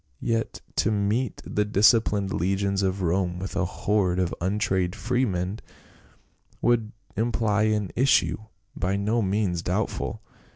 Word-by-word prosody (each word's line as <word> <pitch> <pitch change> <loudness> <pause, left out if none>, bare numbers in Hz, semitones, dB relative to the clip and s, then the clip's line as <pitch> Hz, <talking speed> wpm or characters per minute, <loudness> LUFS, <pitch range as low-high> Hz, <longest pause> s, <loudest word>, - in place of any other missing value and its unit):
" - - -45
Yet 115 -1 -2 0.2
to - - +3
meet 105 +4 -1
the 105 - 0
disciplined 105 -1 +3
legions 100 +2 0
of 95 0 -1
Rome 90 +1 0
with 95 +2 -5
a 95 -1 +1
horde 95 -1 0
of 90 -2 0
untrained 95 -1 0
freedmen 105 -4 -1 1.0
would 115 -2 +1 0.2
imply 110 -1 +1
an 105 -5 -1
issue 135 -1 +3 0.4
by 90 +3 -1
no 105 +4 +1
means 95 -3 0
doubtful. - - -2
100 Hz, 130 wpm, -26 LUFS, 95-110 Hz, 1.0 s, to